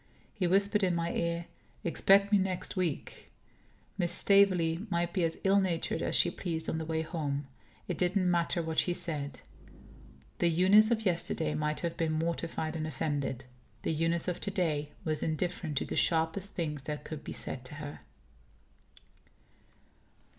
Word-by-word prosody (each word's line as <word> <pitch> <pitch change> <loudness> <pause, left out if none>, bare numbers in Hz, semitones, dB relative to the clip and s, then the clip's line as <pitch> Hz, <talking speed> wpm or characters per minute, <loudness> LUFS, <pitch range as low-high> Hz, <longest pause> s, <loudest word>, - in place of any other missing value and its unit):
He 190 -5 0
whispered 200 +3 +3
in 180 -2 +2
my 170 0 -1
ear: 170 0 -1 0.4
"Expect 195 +4 +4
me 205 - +5
next 185 -1 -2
week." 175 -6 -3 0.7
Miss 175 -1 +1
Staveley 185 -1 +3
might 170 -1 0
be 185 - +1
as 165 -1 0
ill 195 +1 +4
natured 175 -4 -1
as - - 0
she 175 - +4
pleased, 165 -3 -4
on 160 - -1
the 160 - -4
way 160 0 -1
home. 150 -3 -3 0.4
It - - -3
didn't 185 +1 +2
matter 170 0 +1
what 160 0 0
she 175 - +1
said. 150 -6 -2 1.0
The 175 - +3
Eunice 190 +6 +6
of 225 -2 0
yesterday 165 -3 0
might 150 -1 -1
have 170 -1 -3
been 160 -1 0
mortified 165 0 -2
and 155 -1 -2
offended. 140 -3 -2 0.4
The - - 0
Eunice 165 +2 0
of 180 - -2
to - - 0
day 155 -6 -1
was 155 -2 0
indifferent 160 -1 -2
to - - +1
the - - -4
sharpest 165 +4 +1
things 150 -5 -3
that 150 -1 -4
could 155 -2 -7
be - - -6
said 130 - -5
to 140 - -7
her. 145 -1 -7
170 Hz, 165 wpm, -31 LUFS, 155-185 Hz, 1.0 s, Eunice